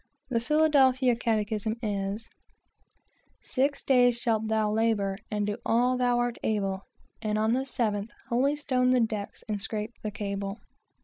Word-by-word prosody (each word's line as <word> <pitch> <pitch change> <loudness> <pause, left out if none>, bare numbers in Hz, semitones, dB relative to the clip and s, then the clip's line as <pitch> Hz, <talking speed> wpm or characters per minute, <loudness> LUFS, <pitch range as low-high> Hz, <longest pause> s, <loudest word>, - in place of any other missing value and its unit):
The 230 - +2
"Philadelphia 265 -3 +4
Catechism" 220 -1 -1
is, 205 +1 -2 1.1
"Six 275 +2 -1
days 245 -2 +4
shalt 225 -3 0
thou 215 -1 +1
labor 210 -3 +1
and 210 -1 -1
do 210 +1 -2
all 245 +2 +2
thou 245 -1 +2
art 240 -1 -1
able, 195 -3 -1 0.3
And 215 -1 -1
on 220 +1 +2
the 260 +2 0
seventh 215 -4 -1 0.2
holystone 260 0 +1
the 255 0 +4
decks 215 -3 -2
and 210 -2 -2
scrape 215 +2 -3
the 215 - -3
cable." 200 -1 -4
225 Hz, 140 wpm, -28 LUFS, 210-250 Hz, 1.1 s, Philadelphia